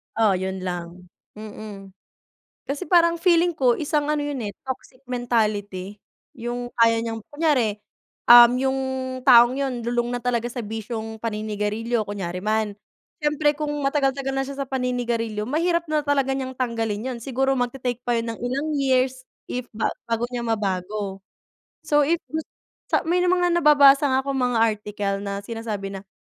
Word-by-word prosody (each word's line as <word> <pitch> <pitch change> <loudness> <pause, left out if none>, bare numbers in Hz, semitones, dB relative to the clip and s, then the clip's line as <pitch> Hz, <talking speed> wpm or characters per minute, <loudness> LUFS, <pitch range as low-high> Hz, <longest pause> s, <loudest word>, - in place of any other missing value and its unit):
Oh, 220 -2 +4
yun 190 0 -4
lang. 175 0 -6 0.3
Mm. 210 -2 -9 0.8
Kasi 285 +6 -3
parang 335 -1 +5
feeling 345 -1 +3
ko 250 -4 +3
isang 295 -1 0
ano 300 - 0
yun, 290 -3 -3
eh, 205 - -3
toxic 260 0 -7
mentality, 210 -5 -1 0.4
yung 245 0 -5
kaya 230 -1 +4
niyang 225 -1 -4
kunyari, 290 -9 +1 0.5
um, 240 0 +10
yung 265 +1 0 0.4
taong 245 -1 +7
yun 255 -4 -2
lulong 240 0 -1
na - - -3
talaga 240 -1 0
sa 245 0 -5
bisyong 220 +1 -5
paninigarilyo 215 +1 -2
kunyari 180 -3 -4
man. 215 0 -1 0.5
Siyempre 295 0 +2
kung 300 -1 -3
matagal-tagal 275 -1 0
na 270 - 0
siya 280 0 -7
sa 270 - -13
paninigarilyo, 240 -4 -2
mahirap 335 +4 0
na 305 -1 0
talaga 275 -2 +1
niyang 260 -1 -3
tanggalin 230 -1 -2
yun. 240 - -6
Siguro 270 +1 0
mag-te-take 245 -1 -2
pa 240 -1 0
yun 230 0 -3
ng - - -17
ilang 275 +5 -1
years 260 -2 +1 0.2
if 250 0 -4
ba 220 - 0 0.2
bago 230 0 -1
niya 240 -1 -3
mabago. 200 -2 -2 0.7
So 295 0 +4
if 340 +1 +2
gus 315 +1 -2 0.4
sa - - +1
may 345 +3 +1
mga 360 0 +2
nababasa 290 -4 +6
nga 265 -1 +2
akong 275 0 -2
mga 245 -2 +1
article 210 -2 -1
na 200 0 -4
sinasabi 215 -3 -5
na, 195 0 -8
240 Hz, 160 wpm, -23 LUFS, 215-275 Hz, 0.8 s, um